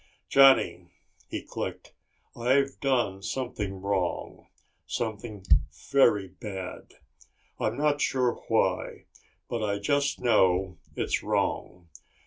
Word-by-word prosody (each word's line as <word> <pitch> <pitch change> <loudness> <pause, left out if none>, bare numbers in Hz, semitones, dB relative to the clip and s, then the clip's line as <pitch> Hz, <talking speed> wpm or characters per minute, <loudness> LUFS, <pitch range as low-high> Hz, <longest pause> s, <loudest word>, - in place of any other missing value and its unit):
"Johnny," 135 -10 +5 0.4
he - - -4
clicked, - - -6 0.4
"I've 135 +3 +1
done 120 -8 0
something 105 -5 -4
wrong. 95 -3 -2 0.4
Something 110 -3 -4 0.5
very 105 -8 +4
bad. 95 -2 -8 0.6
I'm 110 +2 -1
not 145 0 +1
sure 125 -2 +2
why, - - 0 0.4
but 115 - -3
I 100 -1 0
just 140 +7 0
know 95 -6 +2 0.2
it's - - -1
wrong. 90 -1 -2
110 Hz, 100 wpm, -28 LUFS, 95-130 Hz, 0.6 s, Johnny